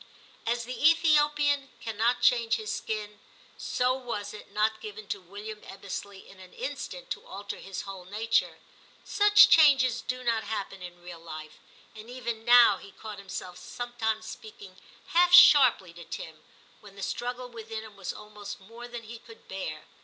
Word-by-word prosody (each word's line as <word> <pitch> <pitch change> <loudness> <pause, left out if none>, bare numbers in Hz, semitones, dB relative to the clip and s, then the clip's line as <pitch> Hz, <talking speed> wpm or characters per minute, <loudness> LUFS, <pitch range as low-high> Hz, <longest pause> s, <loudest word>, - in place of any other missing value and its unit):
As 235 +1 0
the 255 +5 +3
Ethiopian 295 -3 +3
cannot 225 +2 0
change 230 -2 +4
his 220 -2 -4
skin, 210 -1 -4 0.4
so 250 0 0
was 235 -6 -5
it 210 - -12
not 215 +1 0
given 215 0 -8
to 200 - -3
William 205 +4 -9
Ebbesley 200 0 -8
in 195 - -16
an 185 -1 -14
instant - - -6
to - - -4
alter 200 +1 -7
his 195 -1 -7
whole 195 -2 -9
nature; 220 +4 0 0.5
such 415 0 +6
changes 270 -6 +5
do 255 0 -4
not 230 -2 0
happen 195 -3 -5
in 175 -1 -10
real 175 -1 -9
life; 155 -2 -10 0.3
and 220 +1 -12
even 235 -3 -5
now 240 -4 +7
he 200 - -13
caught 215 -2 -9
himself 185 -2 -7
sometimes 225 -3 -3
speaking 205 -4 -11 0.3
half 350 +1 +4
sharply 255 - +7
to 170 0 -11
Tim, 160 -1 -8 0.4
when 200 -2 -15
the 200 - -8
struggle 245 +5 -4
within 225 -1 -7
him 215 -2 -13
was 195 -2 -5
almost 210 -1 -9
more 230 +5 -11
than 240 -1 -8
he 230 +1 -10
could 225 -1 -16
bear. 155 -5 -6
220 Hz, 165 wpm, -28 LUFS, 200-245 Hz, 0.5 s, now